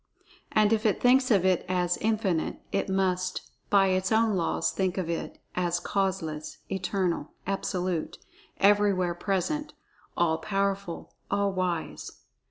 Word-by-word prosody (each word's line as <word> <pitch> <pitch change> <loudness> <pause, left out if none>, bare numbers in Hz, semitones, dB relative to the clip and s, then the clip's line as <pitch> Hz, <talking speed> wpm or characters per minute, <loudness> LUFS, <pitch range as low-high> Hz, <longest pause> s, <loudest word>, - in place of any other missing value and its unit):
And 215 0 +4
if 220 -1 +1
it 215 - +2
thinks 255 +1 +4
of 195 -5 +4
It 185 -2 +3
as 180 -1 +1
"Infinite," 210 -6 0
it 195 - -1
must, 185 -1 -1 0.2
by 195 -1 +5
its 185 +1 0
own 220 -1 +3
laws, 170 -3 0
think 190 -1 -1
of 175 -3 -1
It 165 - -4 0.2
as 175 -1 0
Causeless; 185 -6 -2
Eternal; 185 -2 -1
Absolute; 185 -3 -2 0.4
Everywhere 200 -3 +4
present; 205 - -2 0.4
All 165 -2 +2
Powerful; 195 -3 -2 0.2
All 200 0 +1
Wise. 180 -3 -3
190 Hz, 130 wpm, -28 LUFS, 180-200 Hz, 0.4 s, by